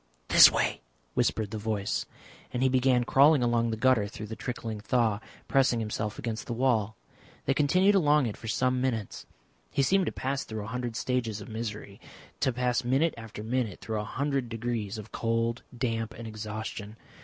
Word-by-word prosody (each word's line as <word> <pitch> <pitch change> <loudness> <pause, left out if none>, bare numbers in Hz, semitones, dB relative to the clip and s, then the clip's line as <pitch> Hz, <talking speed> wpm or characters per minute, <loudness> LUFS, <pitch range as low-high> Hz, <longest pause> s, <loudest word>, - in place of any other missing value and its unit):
"This - - +9
way," - - 0 0.3
whispered 105 - 0
the 110 - -4
voice, 105 -1 -2 0.4
and 125 - -1
he 130 - +4
began 130 -1 +3
crawling 140 +2 +5
along 120 -1 +2
the 110 - -2
gutter 115 -3 +3
through 110 +1 -7
the 110 +1 -6
trickling 115 -2 -5
thaw, 110 -1 +1 0.3
pressing 130 -3 +3
himself 105 -1 -3
against 115 -2 -4
the 120 - -2
wall. 110 -5 +1 0.5
They 135 - +2
continued 180 +8 +4
along 150 -7 +4
it 110 - -3
for 115 - -10
some 125 +3 +1
minutes. 115 -6 -3 0.4
He 135 - +1
seemed 190 +7 +3
to - - 0
pass 135 +1 -2
through 110 -2 -5
a - - -7
hundred 125 -2 -3
stages 115 -4 -1
of 100 - -9
misery, 105 -3 -6 0.4
to 130 - +2
pass 125 0 0
minute 135 +6 +2
after 115 -2 -8
minute 115 -4 -1
through 110 -1 -3
a - - -2
hundred 135 +2 -2
degrees 115 -2 -3
of 110 0 -9
cold, 115 +1 -1 0.2
damp, 115 -2 -2
and 115 +1 -7
exhaustion. 110 0 -6
115 Hz, 180 wpm, -28 LUFS, 110-130 Hz, 0.5 s, This